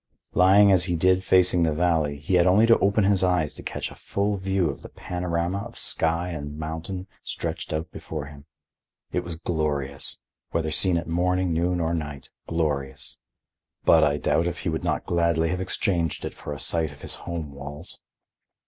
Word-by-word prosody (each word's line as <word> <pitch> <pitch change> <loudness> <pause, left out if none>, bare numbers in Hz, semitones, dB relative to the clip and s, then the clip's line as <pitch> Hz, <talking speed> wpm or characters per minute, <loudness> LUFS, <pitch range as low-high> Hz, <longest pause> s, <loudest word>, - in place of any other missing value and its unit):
Lying 100 +2 +6
as 90 -2 +4
he 90 -2 0
did 95 +2 +3
facing 90 -1 +4
the 80 -2 +2
valley, 80 -4 +1
he 75 +6 -4
had 90 0 +5
only 100 +5 +5
to 115 0 +5
open 100 +2 +3
his 95 -1 +3
eyes 90 -5 +1
to - - -8
catch - - -4
a - - -11
full 100 +1 -1
view 95 -2 0
of 70 - -5
the - - -10
panorama 90 +1 -2
of 115 +3 -8
sky 85 +2 +1
and 75 -3 -6
mountain 80 +4 -5 0.2
stretched - - -4
out 80 +2 -3
before 75 -3 -6
him. 70 0 -12 0.7
It - - 0
was 85 -1 -6
glorious; 75 -5 -2 0.3
whether 80 -2 -1
seen 85 +3 +3
at 85 - -3
morning, 90 +1 +1
noon 90 +2 +1
or 85 0 0
night, 75 -4 -5 0.2
glorious. 70 -4 -2 0.7
But 80 -1 +6
I 75 -1 +2
doubt 85 +3 +1
if 85 0 -4
he 90 - -1
would 80 - -2
not - - -1
gladly 85 -1 +1
have 90 +1 -2
exchanged 85 -3 -1
it - - -5
for - - -8
a 70 - -5
sight 80 -3 +1
of 75 - -15
his - - -5 0.2
home 80 -4 -4
walls. 70 +4 -8
85 Hz, 190 wpm, -25 LUFS, 75-90 Hz, 0.7 s, Lying